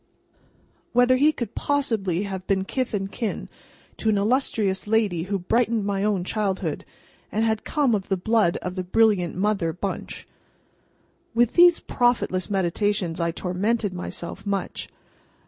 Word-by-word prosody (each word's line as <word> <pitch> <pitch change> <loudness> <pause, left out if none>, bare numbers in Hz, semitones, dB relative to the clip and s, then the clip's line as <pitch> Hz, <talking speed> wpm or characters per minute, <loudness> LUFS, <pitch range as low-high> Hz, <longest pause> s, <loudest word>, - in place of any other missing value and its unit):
Whether 245 +1 +5
he 295 +4 +5
could 235 -7 -5
possibly 220 -11 0
have 190 -2 -5
been 190 -1 +1
kith 255 0 -2
and 195 -1 -3
kin 225 -4 -4 0.5
to 220 - 0
an 210 - +3
illustrious 210 -3 +1
lady 205 -6 +1
who 200 +1 -1
brightened 225 +3 +1
my 200 -1 -1
own 205 -4 +1
childhood, 195 0 -2 0.5
and 220 +2 +1
had 220 -1 0
come 285 -6 +1
of 200 -2 -2
the 190 - +1
blood 210 -2 +2
of 180 - -3
the 185 0 -3
brilliant 195 -2 +2
Mother 190 -3 0
Bunch? 190 +3 -5 1.1
With 240 0 +3
these 350 -1 +6
profitless 240 -7 0
meditations 190 -2 0
I 170 0 +1
tormented 195 +5 -1
myself 180 +1 -6
much. 200 -1 -3
205 Hz, 145 wpm, -24 LUFS, 185-230 Hz, 1.1 s, these